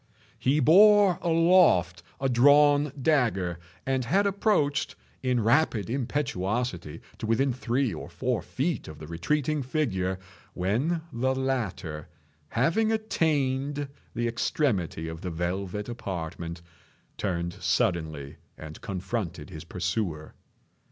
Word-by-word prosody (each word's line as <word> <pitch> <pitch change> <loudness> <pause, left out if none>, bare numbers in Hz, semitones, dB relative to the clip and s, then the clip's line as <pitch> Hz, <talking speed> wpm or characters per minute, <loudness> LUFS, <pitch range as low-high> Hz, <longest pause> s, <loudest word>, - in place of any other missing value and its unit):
He 140 +4 +2
bore 200 +5 +6
aloft 165 - +4 0.2
a 135 - 0
drawn 145 +3 +5
dagger, 115 - +1 0.3
and 130 -1 0
had 195 +12 +2
approached, 195 -8 +1 0.3
in 125 -3 +1
rapid 115 - +2
impetuosity, 115 - -2 0.2
to 110 - -4
within 125 +4 +2
three 125 -1 -1
or - - -7
four 125 -3 -1
feet 150 +5 -2
of 75 - -9
the 75 - -9
retreating 145 - -1
figure, 105 - -1 0.4
when 130 - 0
the 130 +3 0
latter, 110 - -3 0.4
having 170 - +2
attained 145 -9 0 0.3
the 120 +1 0
extremity 110 - -1
of 80 0 -7
the 90 - -4
velvet 95 +4 -3
apartment, 85 -6 -5 0.5
turned 85 -3 -2
suddenly 80 -6 -1 0.2
and 80 0 -10
confronted 95 -4 -4
his 80 -1 -8
pursuer. 90 -2 -3
120 Hz, 110 wpm, -27 LUFS, 90-145 Hz, 0.5 s, bore